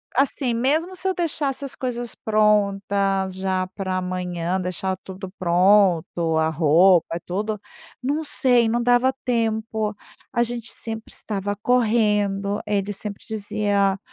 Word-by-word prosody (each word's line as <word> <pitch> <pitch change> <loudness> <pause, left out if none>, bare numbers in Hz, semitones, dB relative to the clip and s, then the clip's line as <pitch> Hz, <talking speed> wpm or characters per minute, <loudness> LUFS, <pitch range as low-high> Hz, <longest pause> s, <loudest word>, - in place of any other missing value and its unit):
Assim, 265 -1 +1
mesmo 310 +10 0
se 380 - -1
eu 380 - +2
deixasse 295 -6 -1
as 275 - -3
coisas 245 -2 -4
prontas 200 -3 +1
já 190 -1 -1
pra 190 -2 -2
amanhã, 180 -1 -2
deixar 185 +1 -2
tudo 190 +1 -9
pronto, 175 -2 +3
a 160 0 +2
roupa, 165 +2 +4
tudo, 210 +3 -3 0.4
não 290 +5 -1
sei, 245 -5 +2
não 235 +2 +1
dava 245 +2 +3
tempo. 220 -3 -1 0.4
A 235 - +2
gente 240 -1 -2
sempre 225 -1 -5
estava 205 -1 -3
correndo, 210 -3 +1
ele 205 0 -1
sempre 205 0 -6
dizia: 205 -2 0
205 Hz, 125 wpm, -23 LUFS, 190-235 Hz, 0.4 s, roupa